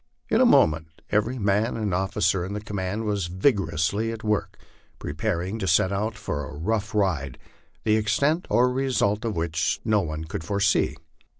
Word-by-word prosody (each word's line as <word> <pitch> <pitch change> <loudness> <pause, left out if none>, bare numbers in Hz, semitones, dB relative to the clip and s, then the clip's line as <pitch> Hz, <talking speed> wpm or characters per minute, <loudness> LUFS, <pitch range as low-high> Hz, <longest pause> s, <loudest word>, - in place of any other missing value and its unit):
tn - - +4
a - - +6
moment 80 +1 +2
every 110 +5 +1
man 105 +2 +1
and 105 -4 -1
officer 95 0 +1
in 95 +3 -5
the 105 - -3
command 105 0 -3
was 100 -4 -1
vigorously 95 - +1
at 115 -1 -7
work 105 -1 -1 0.4
preparing 90 +5 -3
to 95 - -2
set 95 - +3
out 105 +3 -1
for 75 -9 -3
a 75 - -9
rough 105 +6 -2
ride, 80 -11 0 0.5
the 110 -1 +3
extent 140 - +1
or 125 +1 +3
result 125 -5 0
of 115 -2 -2
which 85 0 0
no 110 -1 +3
one 75 -3 -4
could 80 0 -5
foresee. 100 +2 +1
100 Hz, 170 wpm, -25 LUFS, 85-110 Hz, 0.5 s, a